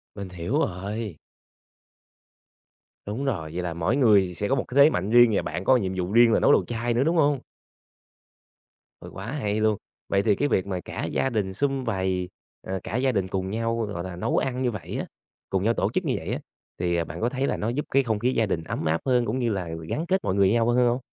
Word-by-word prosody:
Mình 100 Hz, -2 st, -6 dB
hiểu 90 Hz, -, -2 dB
rồi. 100 Hz, -, -3 dB, 1.9 s
Đúng 110 Hz, +7 st, -3 dB
rồi, 80 Hz, -, -2 dB
vậy 90 Hz, 0 st, -3 dB
là 85 Hz, -2 st, -3 dB
mỗi 85 Hz, +9 st, 0 dB
người 105 Hz, -9 st, +4 dB
sẽ 100 Hz, +5 st, -2 dB
có 135 Hz, -, +2 dB
một 130 Hz, -, 0 dB
cái 130 Hz, -, -6 dB
thế 155 Hz, -, +7 dB
mạnh 95 Hz, -, -2 dB
riêng 120 Hz, -1 st, +7 dB
và -, -, +2 dB
bạn -, -, -4 dB
có 130 Hz, -, +6 dB
nhiệm 95 Hz, -4 st, -2 dB
vụ 90 Hz, +1 st, -2 dB
riêng 115 Hz, 0 st, +6 dB
là -, -, +4 dB
nấu -, -, +4 dB
đồ -, -, +4 dB
chay 120 Hz, 0 st, -2 dB
nữa, 125 Hz, +3 st, +2 dB
đúng 165 Hz, +3 st, +1 dB
hông? 145 Hz, -4 st, +3 dB, 1.6 s
Ừ, -, -, -9 dB
quá -, -, -6 dB
hay 110 Hz, -8 st, -1 dB
luôn, 110 Hz, -2 st, +2 dB, 0.3 s
vậy 100 Hz, 0 st, +2 dB
thì 105 Hz, -3 st, +3 dB
cái 145 Hz, -, +1 dB
việc 95 Hz, -9 st, +1 dB
mà 95 Hz, -2 st, -2 dB
cả -, -, -5 dB
gia 135 Hz, -, 0 dB
đình 100 Hz, -5 st, -1 dB
sum 135 Hz, +3 st, -1 dB
vầy, 95 Hz, -3 st, -1 dB, 0.4 s
rồi 95 Hz, 0 st, -2 dB
cả 110 Hz, -, -5 dB
gia 130 Hz, +1 st, +2 dB
đình 95 Hz, -4 st, 0 dB
cùng 95 Hz, 0 st, -3 dB
nhau, 115 Hz, +2 st, -1 dB
gọi 100 Hz, -4 st, -5 dB
là, 95 Hz, -2 st, -6 dB
nấu 90 Hz, -, -1 dB
ăn 130 Hz, -1 st, -1 dB
như 125 Hz, -2 st, +1 dB
vậy 105 Hz, -, -6 dB
á, -, -, -3 dB, 0.4 s
cùng 95 Hz, 0 st, 0 dB
nhau 115 Hz, +2 st, +3 dB
tổ -, -, 0 dB
chức -, -, 0 dB
như -, -, +1 dB
vậy -, -, -4 dB
á, -, -, -2 dB, 0.4 s
thì, 85 Hz, -1 st, 0 dB
à, 85 Hz, -, +1 dB
bạn 85 Hz, -, -8 dB
có 120 Hz, -, +2 dB
thấy 135 Hz, +1 st, -1 dB
là -, -, -1 dB
nó 110 Hz, -, -2 dB
giúp 140 Hz, +5 st, -2 dB
cái 135 Hz, +1 st, +4 dB
không 110 Hz, -4 st, -1 dB
khí 125 Hz, +4 st, +1 dB
gia 110 Hz, -, +2 dB
đình 85 Hz, -5 st, -2 dB
ấm 80 Hz, -, -4 dB
áp 80 Hz, +1 st, +1 dB
hơn 125 Hz, -2 st, +2 dB
cũng 120 Hz, +4 st, -1 dB
như 120 Hz, -2 st, +1 dB
là 95 Hz, -4 st, -3 dB, 0.2 s
gắn 165 Hz, -, -2 dB
kết 190 Hz, +1 st, 0 dB
mọi 95 Hz, -, 0 dB
người 100 Hz, -1 st, +4 dB
với 95 Hz, -, +2 dB
nhau 115 Hz, 0 st, +2 dB
hơn 120 Hz, 0 st, +4 dB
hông? 120 Hz, +2 st, +1 dB
110 Hz, 255 wpm, -25 LUFS, 95-125 Hz, 1.9 s, thế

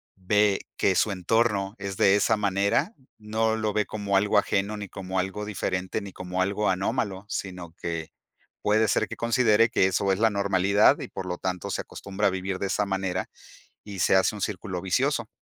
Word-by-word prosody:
ve 100 Hz, +2 st, +2 dB, 0.2 s
que 95 Hz, -, +2 dB
su 105 Hz, -, +2 dB
entorno 100 Hz, +1 st, 0 dB
es 100 Hz, -1 st, -5 dB
de 95 Hz, 0 st, +5 dB
esa 110 Hz, +1 st, +2 dB
manera, 100 Hz, -, +1 dB, 0.2 s
no 110 Hz, +1 st, 0 dB
lo 110 Hz, -1 st, -1 dB
ve 105 Hz, -1 st, +1 dB
como 100 Hz, -2 st, -2 dB
algo 100 Hz, +1 st, +3 dB
ajeno 100 Hz, +2 st, +1 dB
ni 105 Hz, -1 st, -6 dB
como 95 Hz, 0 st, -4 dB
algo 95 Hz, +3 st, -3 dB
diferente, 95 Hz, -1 st, -2 dB
ni 100 Hz, -2 st, -9 dB
como 90 Hz, 0 st, -3 dB
algo 100 Hz, +2 st, 0 dB
anómalo, 95 Hz, +1 st, -1 dB
sino 90 Hz, -5 st, -5 dB
que 85 Hz, -2 st, -5 dB, 0.5 s
puede 110 Hz, +1 st, +3 dB
ser 110 Hz, -, +1 dB
que 115 Hz, -, -8 dB
considere 115 Hz, -1 st, +3 dB
que 95 Hz, -, +3 dB
eso 95 Hz, +1 st, +1 dB
es 95 Hz, -, -2 dB
la 115 Hz, -, +4 dB
normalidad 100 Hz, 0 st, +3 dB
y, -, -, -6 dB
por 95 Hz, -, -6 dB
lo 90 Hz, -1 st, -3 dB
tanto, 90 Hz, -2 st, -3 dB
se -, -, -1 dB
acostumbra 100 Hz, +1 st, -3 dB
a -, -, +4 dB
vivir 95 Hz, 0 st, -3 dB
de 100 Hz, -, -1 dB
esa 105 Hz, -, 0 dB
manera 95 Hz, -1 st, -2 dB, 0.5 s
y 100 Hz, -3 st, -8 dB
se -, -, +4 dB
hace 95 Hz, +3 st, +3 dB
un 105 Hz, -, -8 dB
círculo 95 Hz, -2 st, -3 dB
vicioso. 120 Hz, +5 st, 0 dB
100 Hz, 195 wpm, -26 LUFS, 95-105 Hz, 0.5 s, de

